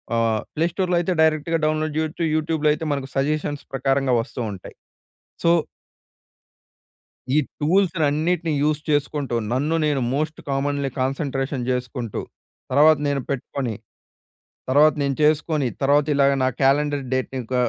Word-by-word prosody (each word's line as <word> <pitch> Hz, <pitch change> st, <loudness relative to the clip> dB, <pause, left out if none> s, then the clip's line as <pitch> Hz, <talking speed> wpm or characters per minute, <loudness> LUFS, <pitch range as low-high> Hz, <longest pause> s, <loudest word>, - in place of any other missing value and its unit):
ఆహ్, 115 Hz, -2 st, +1 dB
ప్లే 160 Hz, +2 st, +2 dB
స్టోర్‌లో 180 Hz, -2 st, 0 dB
అయితే, 175 Hz, -, -1 dB
డైరెక్ట్‌గ 160 Hz, +1 st, +2 dB
డౌన్లోడ్ 155 Hz, 0 st, -1 dB
చేయొచ్చు. 160 Hz, +2 st, -2 dB
యూట్యూబ్‌లొ 155 Hz, -1 st, +1 dB
అయితే 155 Hz, +2 st, -5 dB
మనకు 140 Hz, -1 st, -4 dB
సజెషన్స్ 145 Hz, +1 st, -1 dB
ప్రకారంగా 135 Hz, -1 st, +1 dB
వస్తూ 125 Hz, +1 st, -7 dB
ఉంటాయి. 95 Hz, -, -11 dB, 0.7 s
సో... 170 Hz, -, +5 dB, 1.8 s
ఈ -, -, +6 dB, 0.2 s
టూల్స్‌లన్నిటిని 165 Hz, -1 st, +1 dB
యూజ్ 150 Hz, 0 st, +1 dB
చేసుకుంటూ, 145 Hz, -3 st, 0 dB, 0.2 s
నన్ను 145 Hz, +6 st, +1 dB
నేను 145 Hz, -3 st, +1 dB
మోస్ట్ 155 Hz, +2 st, -2 dB
కామన్‌లీ 140 Hz, 0 st, 0 dB
కాన్సంట్రేషన్ 135 Hz, -1 st, -2 dB
జేసుకుంటూ, 125 Hz, -2 st, -3 dB, 0.5 s
తర్వాత 150 Hz, +3 st, +5 dB
నేను 140 Hz, -1 st, 0 dB
పెట్టుకొని, 130 Hz, -2 st, -3 dB, 1.0 s
తర్వాత 150 Hz, +3 st, +5 dB
నేను 140 Hz, -1 st, 0 dB
చేసుకొని, 155 Hz, -2 st, +2 dB
తర్వాత 140 Hz, +1 st, +3 dB
ఇలాగ 140 Hz, 0 st, +4 dB
నా 130 Hz, -, +3 dB
క్యాలెండర్ 145 Hz, +1 st, +2 dB
డేట్‌ని 130 Hz, 0 st, -2 dB
ఒక 130 Hz, -, -3 dB
145 Hz, 125 wpm, -22 LUFS, 135-155 Hz, 1.8 s, ఈ